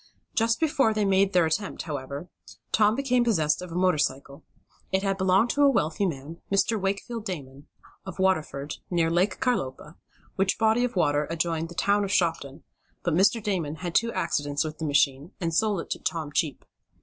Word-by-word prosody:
Just 230 Hz, 0 st, +1 dB
before 285 Hz, -8 st, +2 dB
they 210 Hz, -1 st, +1 dB
made 195 Hz, 0 st, +3 dB
the 180 Hz, -3 st, +4 dB
attempt, 190 Hz, +5 st, -2 dB
however, 145 Hz, +1 st, -5 dB, 0.4 s
Tom 215 Hz, 0 st, +4 dB
became 250 Hz, -2 st, +2 dB
possessed 160 Hz, -11 st, +1 dB
of 180 Hz, -1 st, -8 dB
a -, -, -6 dB
motor 180 Hz, -3 st, +2 dB
cycle. 140 Hz, 0 st, -2 dB, 0.5 s
It 190 Hz, +1 st, +1 dB
had 195 Hz, -1 st, +1 dB
belonged 190 Hz, +4 st, +3 dB
to 290 Hz, -, 0 dB
a 285 Hz, -, +7 dB
wealthy 195 Hz, -, +1 dB
man, 155 Hz, +1 st, -6 dB
Mr. 200 Hz, +2 st, +2 dB
Wakefield 200 Hz, +4 st, -3 dB
Damon, 145 Hz, -8 st, -7 dB, 0.4 s
of 190 Hz, -2 st, -8 dB
Waterford, 155 Hz, -6 st, 0 dB
near 165 Hz, -2 st, +1 dB
Lake 180 Hz, +4 st, +1 dB
Carlopa, 150 Hz, -, -2 dB, 0.4 s
which 195 Hz, 0 st, +1 dB
body 225 Hz, +2 st, +3 dB
of 250 Hz, -3 st, -2 dB
water 145 Hz, -4 st, +2 dB
adjoined 165 Hz, 0 st, -1 dB
the 170 Hz, -, -11 dB
town 205 Hz, +3 st, +2 dB
of 195 Hz, -, -3 dB
Shopton; 165 Hz, -5 st, 0 dB, 0.4 s
but 175 Hz, -, 0 dB
Mr. 200 Hz, +6 st, +3 dB
Damon 175 Hz, -8 st, -1 dB
had 175 Hz, 0 st, -5 dB
two 230 Hz, +4 st, +2 dB
accidents 145 Hz, -5 st, -1 dB
with 155 Hz, -1 st, -6 dB
the 160 Hz, -, -3 dB
machine, 145 Hz, +2 st, +1 dB
and 165 Hz, -3 st, -2 dB
sold 205 Hz, 0 st, +1 dB
it -, -, -12 dB
to -, -, -2 dB
Tom 160 Hz, -3 st, -3 dB
cheap. 145 Hz, -4 st, -1 dB
180 Hz, 185 wpm, -26 LUFS, 155-205 Hz, 0.5 s, a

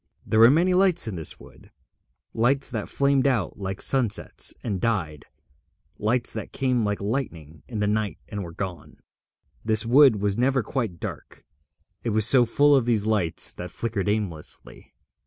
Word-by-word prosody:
There 110 Hz, -, +1 dB
were 115 Hz, +1 st, +8 dB
many 170 Hz, +6 st, +3 dB
lights 180 Hz, -7 st, +2 dB
in 110 Hz, -, -4 dB
this 80 Hz, -3 st, -5 dB
wood, -, -, -17 dB, 0.6 s
lights 135 Hz, +5 st, +1 dB
that 110 Hz, -3 st, -4 dB
flamed 140 Hz, -1 st, +2 dB
out 120 Hz, -7 st, -1 dB
like 95 Hz, -1 st, -5 dB
sunsets 125 Hz, -6 st, +2 dB
and 100 Hz, -6 st, -3 dB
died, 85 Hz, -10 st, -2 dB, 0.7 s
lights 120 Hz, +3 st, 0 dB
that 110 Hz, -2 st, -6 dB
came 125 Hz, -3 st, 0 dB
like 105 Hz, -1 st, -1 dB
lightning 85 Hz, -, -4 dB
in 115 Hz, -, -6 dB
the 105 Hz, -, +1 dB
night 105 Hz, 0 st, -1 dB
and 100 Hz, -2 st, -5 dB
were 85 Hz, -, -8 dB
gone. 85 Hz, -4 st, -7 dB, 0.7 s
This 110 Hz, 0 st, +1 dB
wood 125 Hz, -2 st, +5 dB
was 100 Hz, +1 st, -1 dB
never 130 Hz, 0 st, +2 dB
quite 105 Hz, -7 st, -3 dB
dark, -, -, -8 dB, 0.6 s
it 120 Hz, -, -2 dB
was 110 Hz, -1 st, +1 dB
so 125 Hz, +1 st, +5 dB
full 145 Hz, +5 st, +4 dB
of 130 Hz, -4 st, +2 dB
these 110 Hz, -4 st, +1 dB
lights 105 Hz, -7 st, 0 dB
that 90 Hz, -, -7 dB
flickered 105 Hz, -4 st, -3 dB
aimlessly. 100 Hz, -8 st, -5 dB
110 Hz, 165 wpm, -24 LUFS, 100-125 Hz, 0.7 s, were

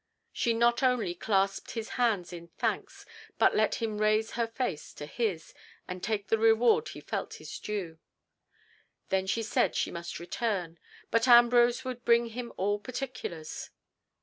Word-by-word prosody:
She 235 Hz, -, +1 dB
not 235 Hz, +1 st, +3 dB
only 250 Hz, -9 st, +2 dB
clasped 195 Hz, +1 st, 0 dB
his 225 Hz, -1 st, -3 dB
hand 215 Hz, -8 st, 0 dB
in 170 Hz, -1 st, -8 dB
thanks, -, -, -2 dB, 0.3 s
but -, -, +4 dB
let 215 Hz, -1 st, +2 dB
him 220 Hz, -2 st, -3 dB
raise 215 Hz, +1 st, +2 dB
her 235 Hz, -1 st, -1 dB
face 225 Hz, -, -4 dB
to 145 Hz, -, -7 dB
his, 185 Hz, 0 st, -3 dB, 0.3 s
and 180 Hz, 0 st, -6 dB
take 205 Hz, 0 st, -2 dB
the 225 Hz, -, +2 dB
reward 240 Hz, -, +4 dB
he -, -, -8 dB
felt -, -, -4 dB
his -, -, -8 dB
due. 185 Hz, -7 st, -4 dB, 1.1 s
Then 190 Hz, 0 st, +1 dB
she 225 Hz, +4 st, 0 dB
said 220 Hz, -, +1 dB
she -, -, 0 dB
must 170 Hz, 0 st, -6 dB
return, 175 Hz, -2 st, -3 dB, 0.3 s
but 230 Hz, +2 st, +3 dB
Ambrose 240 Hz, 0 st, +6 dB
would 250 Hz, -2 st, -5 dB
bring 235 Hz, 0 st, +4 dB
him 235 Hz, +1 st, -6 dB
all 205 Hz, +2 st, 0 dB
particulars. 245 Hz, -, -6 dB
220 Hz, 155 wpm, -29 LUFS, 190-240 Hz, 1.1 s, Ambrose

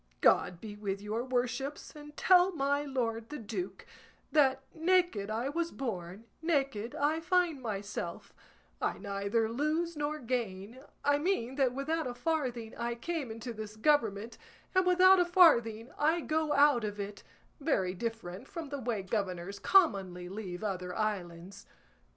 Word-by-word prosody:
God 175 Hz, -, +4 dB
be 210 Hz, 0 st, -8 dB
with 200 Hz, -2 st, -3 dB
your 215 Hz, +3 st, -3 dB
worships, 260 Hz, +4 st, -2 dB
and 295 Hz, 0 st, -12 dB
tell 370 Hz, 0 st, +5 dB
my 285 Hz, -2 st, +1 dB
lord 230 Hz, -5 st, -2 dB
the 300 Hz, -, -5 dB
duke 195 Hz, -5 st, -5 dB, 0.5 s
that 270 Hz, -3 st, +3 dB
'naked 345 Hz, -, +2 dB
I 225 Hz, +4 st, -1 dB
was 335 Hz, +3 st, -1 dB
born, 195 Hz, -6 st, -5 dB, 0.2 s
naked 275 Hz, -9 st, 0 dB
I 300 Hz, +3 st, +1 dB
find 345 Hz, -4 st, +1 dB
myself, 200 Hz, -6 st, -5 dB, 0.5 s
I -, -, 0 dB
neither 200 Hz, +2 st, -1 dB
lose 305 Hz, +8 st, -1 dB
nor 295 Hz, +1 st, -2 dB
gain;' 235 Hz, -2 st, -4 dB, 0.2 s
I 285 Hz, 0 st, +4 dB
mean 295 Hz, -8 st, 0 dB
that 260 Hz, -3 st, +2 dB
without 310 Hz, +2 st, -1 dB
a 245 Hz, -, -5 dB
farthing 245 Hz, -5 st, -2 dB
I 235 Hz, 0 st, -2 dB
came 305 Hz, +1 st, -3 dB
into 230 Hz, +2 st, -6 dB
this 215 Hz, -1 st, -7 dB
government, 225 Hz, -4 st, +1 dB, 0.3 s
and 370 Hz, -1 st, +3 dB
without 370 Hz, +1 st, +7 dB
a 355 Hz, -, +4 dB
farthing 240 Hz, -, +4 dB
I 320 Hz, +3 st, +3 dB
go 310 Hz, 0 st, 0 dB
out 285 Hz, -5 st, +5 dB
of 205 Hz, -1 st, -4 dB
it, 200 Hz, 0 st, -5 dB, 0.4 s
very 195 Hz, -, +1 dB
different 225 Hz, +1 st, -5 dB
from 325 Hz, -4 st, -6 dB
the 285 Hz, 0 st, -4 dB
way 235 Hz, -5 st, -2 dB
governors 190 Hz, -1 st, -3 dB
commonly 195 Hz, -, +3 dB
leave 190 Hz, -2 st, -6 dB
other 180 Hz, -3 st, -3 dB
islands. 190 Hz, -4 st, -4 dB
240 Hz, 150 wpm, -31 LUFS, 205-300 Hz, 0.5 s, without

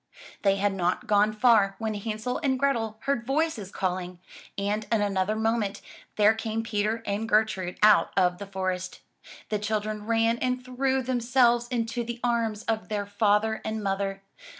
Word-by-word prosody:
They 195 Hz, -1 st, +3 dB
had 200 Hz, 0 st, 0 dB
not 180 Hz, -1 st, -1 dB
gone 210 Hz, 0 st, +3 dB
far, 215 Hz, -3 st, +4 dB
when 220 Hz, -1 st, -2 dB
Hansel 215 Hz, +3 st, -3 dB
and 270 Hz, -4 st, +1 dB
Grethel 230 Hz, -5 st, 0 dB
heard 275 Hz, -4 st, -1 dB
voices 270 Hz, -, -1 dB
calling, 180 Hz, -1 st, -3 dB, 0.4 s
and 205 Hz, +1 st, -1 dB
in 225 Hz, -, +3 dB
another 200 Hz, 0 st, 0 dB
moment 220 Hz, -2 st, 0 dB, 0.4 s
there 210 Hz, +1 st, +5 dB
came 220 Hz, 0 st, -3 dB
Peter 220 Hz, 0 st, -1 dB
and 210 Hz, +3 st, -2 dB
Gertrude 210 Hz, -4 st, +1 dB
out 215 Hz, -1 st, +6 dB
of 180 Hz, -1 st, +2 dB
the 200 Hz, -, -7 dB
forest. 185 Hz, -1 st, -3 dB, 0.5 s
The 210 Hz, -, -1 dB
children 215 Hz, 0 st, -3 dB
ran 230 Hz, 0 st, +2 dB
and 250 Hz, 0 st, -1 dB
threw 260 Hz, +1 st, 0 dB
themselves 240 Hz, -1 st, +2 dB
into 235 Hz, -1 st, -2 dB
the 235 Hz, 0 st, -6 dB
arms 230 Hz, -3 st, 0 dB
of 220 Hz, 0 st, -2 dB
their 205 Hz, -1 st, -2 dB
father 210 Hz, +1 st, +1 dB
and 220 Hz, -1 st, -3 dB
mother. 195 Hz, 0 st, -2 dB
215 Hz, 160 wpm, -27 LUFS, 200-235 Hz, 0.5 s, out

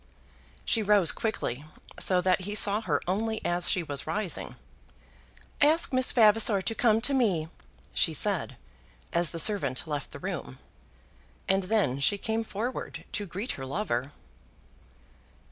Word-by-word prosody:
She 225 Hz, -, +2 dB
rose 205 Hz, -5 st, +4 dB
quickly, 145 Hz, -, -3 dB, 0.4 s
so 180 Hz, -1 st, +3 dB
that 185 Hz, +1 st, +1 dB
he 205 Hz, +3 st, -5 dB
saw 205 Hz, +1 st, +4 dB
her -, -, -1 dB
only 220 Hz, +4 st, -1 dB
as 175 Hz, 0 st, +1 dB
she 180 Hz, -4 st, +2 dB
was 145 Hz, -3 st, -5 dB
rising. 205 Hz, -4 st, -3 dB, 1.1 s
"Ask 305 Hz, 0 st, +3 dB
Miss 255 Hz, 0 st, +3 dB
Vavasor 215 Hz, -3 st, +4 dB
to 225 Hz, -, -1 dB
come 225 Hz, -1 st, +2 dB
to 275 Hz, +4 st, +3 dB
me," 190 Hz, -12 st, +1 dB, 0.4 s
she -, -, +2 dB
said, -, -, +2 dB, 0.6 s
as 170 Hz, -1 st, +2 dB
the 170 Hz, -, -7 dB
servant 155 Hz, -8 st, +2 dB
left 145 Hz, -2 st, -4 dB
the -, -, -9 dB
room; 65 Hz, -, -6 dB, 0.9 s
and 190 Hz, 0 st, +1 dB
then 185 Hz, -, 0 dB
she 200 Hz, +9 st, +2 dB
came 220 Hz, +3 st, -2 dB
forward 225 Hz, +4 st, -5 dB
to 205 Hz, -1 st, -3 dB
greet 195 Hz, +7 st, -4 dB
her 135 Hz, -, -6 dB
lover. 140 Hz, -, -3 dB
200 Hz, 145 wpm, -27 LUFS, 170-220 Hz, 1.1 s, rose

